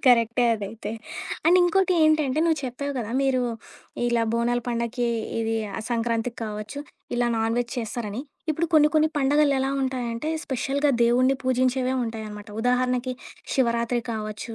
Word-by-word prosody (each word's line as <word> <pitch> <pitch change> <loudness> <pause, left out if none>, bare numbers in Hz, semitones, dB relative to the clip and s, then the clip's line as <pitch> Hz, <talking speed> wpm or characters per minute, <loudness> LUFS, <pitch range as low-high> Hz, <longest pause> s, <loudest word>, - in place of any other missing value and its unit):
కరెక్టే 240 -1 +4
అదైతే. 215 0 -5 0.6
అండ్ 355 +2 +7
ఇంకోటి 370 +1 +3
ఏంటంటే, 310 -3 +3
నువ్వు 325 -2 +2
చెప్పావు 280 +3 -3
కదా! 225 -2 -4
మీరు 260 -2 +2 0.7
ఇలా 235 -1 +2
బోనాల 240 +1 +1
పండగకి, 235 +1 -1 0.3
ఇది 225 0 0 0.2
ఆ - - -3
సంక్రాంతికి 230 0 -1
కావచ్చు 215 +5 -6 0.4
ఇలా 240 0 +2
నాన్‌వెజ్ 230 +2 0
చేస్తారని. 225 -1 -4 0.3
ఇప్పుడు 325 +2 0
కొన్ని 300 -1 +6
కొన్ని 310 0 +4
పండగలెలా 280 -1 +3
ఉంటాయంటే, 250 0 -2 0.2
స్పెషల్‌గా 280 +2 0
దేవుణ్ణి 255 +3 +4
పూజించేవే 255 0 +1
ఉంటాయన్నమాట. 215 -2 -6
ఉదాహరణకి, 250 +1 +1 0.4
శివరాత్రి 235 -1 +1
కావచ్చు 215 +1 -5
245 Hz, 130 wpm, -25 LUFS, 230-270 Hz, 0.7 s, అండ్